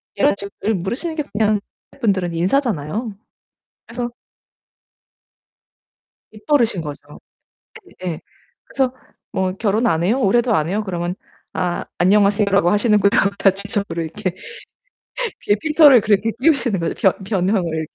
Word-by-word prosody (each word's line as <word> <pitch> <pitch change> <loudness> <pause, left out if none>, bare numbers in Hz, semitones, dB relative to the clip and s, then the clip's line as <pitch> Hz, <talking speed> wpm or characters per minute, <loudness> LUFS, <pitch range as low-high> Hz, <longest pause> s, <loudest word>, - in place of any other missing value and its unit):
이런 285 -4 +3
식으로 200 +2 -3
물으시는 240 - -3
게 305 - -1
그냥 210 0 +2 0.4
분들은 190 -6 0
인사잖아요. 205 - -1 0.7
그래서 240 +1 -5 2.2
입버릇인거죠. 215 - -2 0.9
예 170 -3 -4 0.4
그래서 265 -2 -1 0.4
"뭐 185 -1 -1
결혼 215 +3 0
안 165 -5 +1
해요? 225 +9 +1
올해도 240 +2 +2
안 155 +1 0
해요?" 210 +3 -1
그러면 175 -1 -3 0.4
아 175 -1 -2
'안녕하세요 205 +3 +3
라고 195 -3 +3
하시는구나.' 210 -1 +3
다 195 - +5
지적으로 200 -3 -3
이렇게 170 +3 -4 1.3
필터를 300 -5 +6
그렇게 215 +1 +1
끼우시는 255 - +2
거죠. 165 - -2
변 190 - +3
변형을 180 -5 -1
205 Hz, 285 characters per minute, -20 LUFS, 180-235 Hz, 2.2 s, 필터를